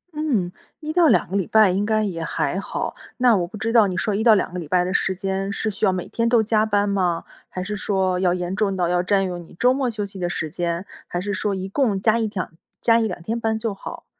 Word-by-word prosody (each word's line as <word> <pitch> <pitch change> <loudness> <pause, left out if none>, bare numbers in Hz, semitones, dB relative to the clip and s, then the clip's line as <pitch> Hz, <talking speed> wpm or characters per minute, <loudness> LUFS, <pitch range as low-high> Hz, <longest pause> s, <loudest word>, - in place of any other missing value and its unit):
嗯。 250 - 0 0.3
1 310 -1 -4
到 345 -1 +5
2 - - +3
个 190 - -3
礼 190 - -1
拜 215 -3 +5
应 195 +3 0
该 215 0 +1
也 175 -5 -3
还 165 +2 -1
好。 195 - -4 0.2
那 245 -2 +5
我 175 -3 0
不 215 - -9
知 220 +2 -2
道 225 -4 +6
你 185 -1 -3
说 210 - 0
1 210 +2 0
到 230 -1 +7
2 185 - -1
个 180 - -3
礼 165 - -7
拜 180 +3 +2
的 185 +1 -2
时 190 -1 +1
间， 195 +1 -2
是 220 +1 -2
需 205 +2 -1
要 190 - +4
每 185 -1 -3
天 230 0 -1
都 235 -2 +4
加 215 0 +2
班 205 -1 +2
吗？ 180 -4 0 0.3
还 185 - -5
是 210 +2 -4
说， 190 -2 0
要 180 -1 +2
严 180 +1 -3
重 205 -2 0
到 175 -2 +1
要 175 0 +2
占 195 +1 +2
用 180 -2 -4
你 165 - -16
周 250 +1 +4
末 265 -1 0
休 215 -3 -3
息 195 -1 -9
的 175 -1 -1
时 160 -2 -3
间？ 170 +2 -2 0.2
还 175 - -3
是 200 +2 -3
说 200 +1 -1
一 190 0 -4
共 210 -3 +1
加 220 +3 +3
1-2 210 -5 -3 0.3
加 230 -1 +4
1-2 210 -6 -2
天 225 +6 -2
班 225 -1 0
就 220 -1 -2
好。 195 - -9
200 Hz, 260 characters per minute, -22 LUFS, 180-220 Hz, 0.3 s, 到